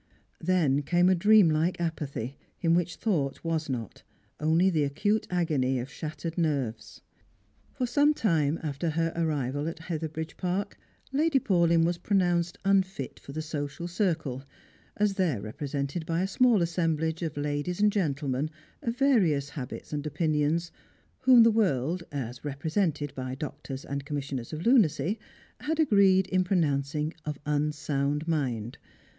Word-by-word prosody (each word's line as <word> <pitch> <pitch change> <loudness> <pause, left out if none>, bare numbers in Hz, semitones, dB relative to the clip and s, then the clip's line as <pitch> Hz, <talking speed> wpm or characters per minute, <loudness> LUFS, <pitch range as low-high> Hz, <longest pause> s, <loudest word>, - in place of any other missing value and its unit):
Then 160 -6 +2
came 175 +5 +3
a - - +5
dream 205 +1 +6
like 160 +4 +1
apathy, 140 -7 -3 0.2
in 165 -1 +2
which 175 0 +1
thought 155 -11 -1
was 165 -2 -1
not, 115 -6 -4 0.4
only 165 +5 +3
the 155 -4 +2
acute 205 +10 0
agony 150 -8 +1
of 125 +2 -5
shattered 155 +2 -5
nerves. 115 - -2 0.7
For 250 - 0
some 290 +5 +3
time 160 - +1
after 150 +2 -2
her 165 +1 0
arrival 145 -3 -1
at 165 - -4
Hetheridge 160 -1 -5
Park, 190 +3 -2 0.3
Lady 295 +1 +2
Paulyn 170 -7 +3
was 175 0 0
pronounced 175 -4 +1
unfit 190 -8 +1
for - - -11
the 155 +2 -4
social 150 +1 -4
circle, 165 - -1 0.5
as 210 -1 +2
there 180 - 0
re 105 +2 -6
presented 140 +3 -3
by 165 +2 0
a - - 0
small 225 -1 +4
assemblage 165 -1 0
of 160 -3 -3
ladies 145 +5 -2
and 210 0 +4
gentlemen 145 -6 -1 0.3
of 235 0 -3
various 185 - +3
habits 135 0 -7
and 150 0 -2
opinions, 155 +2 0 0.5
whom 255 -2 +7
the 230 - +6
world, 175 - +1
as 125 -4 -5
represented 150 +1 -1
by 130 0 -4
doctors 135 -1 -6
and 140 0 -4
commissioners 140 -4 -4
of 155 +1 -5
lunacy, 210 - +3 0.4
had 320 +1 -2
agreed 200 -9 +5
in 185 -1 +2
pronouncing 150 -4 0
of 150 -2 -4
unsound 150 0 -1
mind. 125 -8 -2
160 Hz, 145 wpm, -28 LUFS, 145-185 Hz, 0.7 s, whom